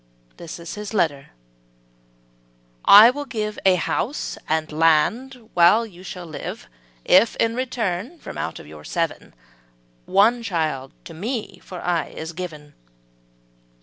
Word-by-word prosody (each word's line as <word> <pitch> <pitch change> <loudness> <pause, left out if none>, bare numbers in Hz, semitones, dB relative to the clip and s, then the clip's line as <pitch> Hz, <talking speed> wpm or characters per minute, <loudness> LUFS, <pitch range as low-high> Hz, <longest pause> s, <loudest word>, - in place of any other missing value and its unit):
``This 170 0 -9
is 170 0 -7
his 210 +2 -6
letter: 145 -8 0 1.6
``'I 220 +5 +10
will 290 +1 -5
give 215 -5 -4
A 185 - +6
house 230 - -2
and 160 0 0
land 215 - +1
while 175 +7 +5
you 180 -5 -14
shall 180 -1 -8
live, 155 - -7 0.4
If, 200 +6 +5
in 230 0 +1
return, 245 - -3
from - - -9
out 80 - -4
your 75 0 -12
seven, 165 - -3 0.7
One 225 +5 +4
child 155 - -2
to 165 - -9
me 200 +1 -5
for 180 - -9
aye 175 -2 -2
is 160 +1 -6
given.''' 155 -4 -8
180 Hz, 130 wpm, -22 LUFS, 160-225 Hz, 1.6 s, ``'I